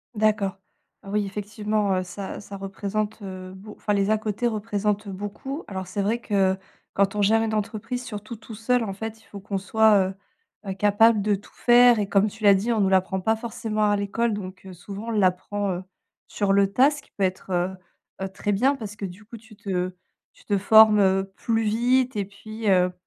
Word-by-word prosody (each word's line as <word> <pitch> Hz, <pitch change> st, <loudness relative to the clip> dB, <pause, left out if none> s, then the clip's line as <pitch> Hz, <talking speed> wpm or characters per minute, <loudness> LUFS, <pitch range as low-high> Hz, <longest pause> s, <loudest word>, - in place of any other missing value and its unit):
D'accord. 210 Hz, -2 st, +1 dB, 0.5 s
Oui 205 Hz, +1 st, -1 dB
effectivement, 210 Hz, 0 st, -1 dB
heu, 185 Hz, -, -1 dB
ça 195 Hz, +3 st, -7 dB
ça 200 Hz, -1 st, -9 dB
représente, 205 Hz, +2 st, -3 dB
heu, 185 Hz, -1 st, -8 dB
beau 210 Hz, +2 st, -11 dB
enfin 210 Hz, -, -1 dB
les 200 Hz, 0 st, +1 dB
à-côtés 215 Hz, +2 st, 0 dB
représentent 210 Hz, -2 st, -1 dB
beaucoup. 205 Hz, -, -6 dB
Alors 190 Hz, -1 st, -5 dB
c'est 200 Hz, +2 st, -3 dB
vrai 220 Hz, +4 st, 0 dB
que 195 Hz, -4 st, +1 dB, 0.4 s
quand 200 Hz, +1 st, +1 dB
on 205 Hz, -, 0 dB
gère 220 Hz, +3 st, +4 dB
une 220 Hz, -1 st, -2 dB
entreprise 225 Hz, +4 st, -3 dB
surtout 215 Hz, -2 st, -7 dB
tout 220 Hz, 0 st, -11 dB
seul 240 Hz, +2 st, +1 dB
en 195 Hz, -3 st, -4 dB
fait, 220 Hz, +2 st, -7 dB
il -, -, -24 dB
faut 200 Hz, -, -10 dB
qu'on 195 Hz, 0 st, -3 dB
soit, 205 Hz, -1 st, +4 dB
heu -, -, -6 dB, 0.5 s
heu, 190 Hz, -, -2 dB
capable 210 Hz, +2 st, +4 dB
de 210 Hz, 0 st, +2 dB
tout 200 Hz, -, -13 dB
faire 240 Hz, -1 st, +6 dB
et 200 Hz, -1 st, -1 dB
comme 200 Hz, +1 st, +3 dB
tu 220 Hz, +1 st, -9 dB
l'as 200 Hz, -1 st, +7 dB
dit, 225 Hz, +5 st, 0 dB
on 215 Hz, -, +1 dB
nous 190 Hz, -, +3 dB
l'apprend 190 Hz, 0 st, +1 dB
pas 220 Hz, +4 st, +2 dB
forcément 215 Hz, -2 st, -1 dB
à 205 Hz, -, +3 dB
l'école. 210 Hz, +3 st, 0 dB
Donc, 190 Hz, -2 st, -7 dB
heu, 185 Hz, -, -9 dB
souvent 200 Hz, +5 st, -8 dB
on 230 Hz, -, -2 dB
l'apprend, 200 Hz, 0 st, 0 dB
heu, 180 Hz, +1 st, -4 dB, 0.4 s
sur 200 Hz, -2 st, 0 dB
le 200 Hz, 0 st, +4 dB
tas, 270 Hz, +3 st, +6 dB
ce 290 Hz, -1 st, -7 dB
qui -, -, -26 dB
peut 200 Hz, -, -3 dB
être, 185 Hz, 0 st, -2 dB
heu 175 Hz, +1 st, +1 dB, 0.5 s
heu, 190 Hz, -, -1 dB
très 200 Hz, +2 st, -3 dB
bien 260 Hz, +8 st, +2 dB
parce 215 Hz, -5 st, -7 dB
que 200 Hz, -, -4 dB
du 185 Hz, +3 st, -9 dB
coup, 230 Hz, +2 st, -11 dB
tu 220 Hz, -1 st, -17 dB
te 185 Hz, -2 st, -3 dB, 0.4 s
tu -, -, -22 dB
te 205 Hz, -, +1 dB
formes, 215 Hz, +1 st, +7 dB
heu, 195 Hz, 0 st, +2 dB
plus 225 Hz, -1 st, 0 dB
vite 245 Hz, +3 st, +2 dB
et 200 Hz, -, 0 dB
puis, 215 Hz, +2 st, -8 dB
heu, 180 Hz, -1 st, +4 dB
205 Hz, 215 wpm, -24 LUFS, 195-220 Hz, 0.5 s, l'as